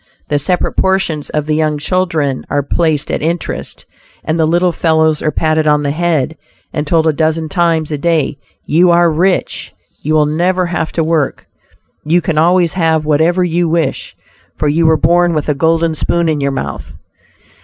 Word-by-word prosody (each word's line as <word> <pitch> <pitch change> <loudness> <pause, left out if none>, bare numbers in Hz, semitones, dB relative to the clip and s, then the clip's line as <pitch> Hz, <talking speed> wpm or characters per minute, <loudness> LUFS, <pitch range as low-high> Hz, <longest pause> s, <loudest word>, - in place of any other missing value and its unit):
The 145 - +1
separate 180 +5 0
portions 190 -6 0
of 150 -1 -2
the 155 - -1
young 155 -1 0
children 155 -4 -1
are 145 -1 0
placed 155 0 0
at - - -2
interest, 170 +3 -4 0.4
and 160 +1 -2
the 160 - +3
little 175 +2 +2
fellows 160 -2 +1
are - - 0
patted 155 0 0
on 150 0 +3
the 140 - 0
head, 160 -2 -1 0.4
and 150 0 -3
told 160 0 +2
a 160 - +2
dozen 160 +1 -1
times 165 -3 0
a 150 - -3
day, 155 -3 0 0.3
"you 175 +4 +3
are 170 -1 +4
rich; 180 +4 -1 0.3
you 155 +1 0
will 150 -1 +4
never 180 +5 0
have 170 -2 -3
to 165 - 0
work, 155 -3 -1 0.6
you 165 +4 +2
can 160 -2 -1
always 175 0 +3
have 160 -3 +1
whatever 160 +4 +2
you 175 -1 0
wish, 160 -4 -2 0.4
for 150 - -1
you 160 +3 +2
were 160 0 +4
born 175 +1 +2
with 150 0 -2
a - - +3
golden 165 +3 +1
spoon 170 +2 0
in 155 -2 0
your 140 - +1
mouth." 70 - -5
160 Hz, 185 wpm, -14 LUFS, 150-170 Hz, 0.6 s, are